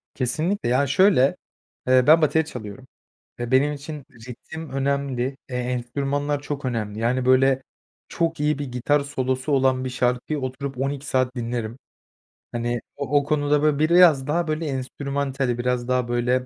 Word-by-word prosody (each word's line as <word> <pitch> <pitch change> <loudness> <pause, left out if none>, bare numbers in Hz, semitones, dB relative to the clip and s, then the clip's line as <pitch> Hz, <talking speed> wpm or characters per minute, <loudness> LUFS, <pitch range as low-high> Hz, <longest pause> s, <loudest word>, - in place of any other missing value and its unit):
Kesinlikle, 155 - -1
ya, 130 +3 +2
şöyle, 180 -4 +4 0.5
eee, 130 0 +5
ben 160 +2 +7
bateri 160 +1 +2
çalıyorum 125 -2 -9 0.5
ve 120 0 -4
benim 140 +3 +3
için 145 0 -7 0.2
ritim 160 +5 -8
önemli, 135 -1 -1
eee, 125 - -5
enstrümanlar 135 +4 -2
çok 145 -1 -5
önemli. 110 -4 -3
Yani, 125 +2 0
böyle, 130 +1 +4 0.5
çok 165 -1 -1
iyi 150 0 +1
bir 145 - -2
gitar 130 +4 +1
solosu 130 0 -2
olan 130 -1 +2
bir - - -2
şarkıyı 125 +4 -1
oturup 130 +1 -5
12 140 +2 -2
saat 130 -2 0
dinlerim. 120 -1 -3 0.7
Hani, 120 0 -2
o 145 0 0
o 140 - -3
konuda, 145 0 +1
böyle, 150 -2 +2
biraz 155 -4 +5
daha, 170 +2 0
böyle, 155 +1 -2
enstrümantali, 135 -1 -2
biraz 120 0 -1
daha 125 -1 +1
böyle, 120 +1 0
135 Hz, 155 wpm, -23 LUFS, 125-145 Hz, 0.7 s, ben